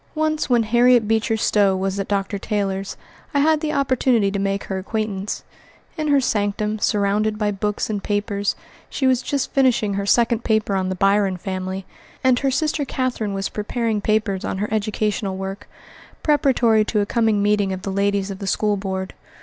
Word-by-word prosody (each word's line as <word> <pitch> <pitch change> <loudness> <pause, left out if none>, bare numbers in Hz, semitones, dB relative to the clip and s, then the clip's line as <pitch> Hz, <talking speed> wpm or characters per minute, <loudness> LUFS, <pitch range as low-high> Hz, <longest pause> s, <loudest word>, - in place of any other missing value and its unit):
Once 310 -1 0
when 240 -2 +4
Harriet 240 0 +4
Beecher 225 +1 +1
Stowe 205 -3 +3
was 190 +1 -2
at 195 - -2
Dr. 200 0 -1
Taylor's, 195 -2 -2 0.4
I - - +4
had 310 +2 +3
the 310 -2 -1
opportunity 260 -7 +2
to 200 - -2
make 195 0 -1
her 190 -1 -3
acquaintance. 210 0 -3 0.5
In 310 -1 -2
her 285 -1 +4
sanctum, 210 -2 -1
surrounded 210 +1 +1
by 210 -1 0
books 210 +1 -2
and 210 -2 -3
papers, 205 -1 -1 0.3
she 270 - -2
was 260 -1 +3
just 280 -1 -2
finishing 245 -6 +2
her 200 0 -2
second 235 +1 +3
paper 215 -2 +1
on 190 -1 0
the 185 - -2
Byron 195 0 +2
family, 185 0 -4 0.4
and 255 -1 +4
her 275 - +1
sister 300 +3 0
Catherine 250 -7 -2
was 195 0 -2
preparing 220 0 -2
papers 215 -3 0
on - - -3
her 210 +2 -2
educational 210 -2 -1
work, 195 +1 -6 0.5
preparatory 250 -7 +3
to 210 -1 0
a - - 0
coming 220 -2 +1
meeting 205 -1 +2
of 190 0 -5
the 195 - -3
ladies 200 0 0
of 195 - -7
the 195 - -5
school 210 +1 +1
board. 190 -1 -4
210 Hz, 180 wpm, -21 LUFS, 195-235 Hz, 0.5 s, when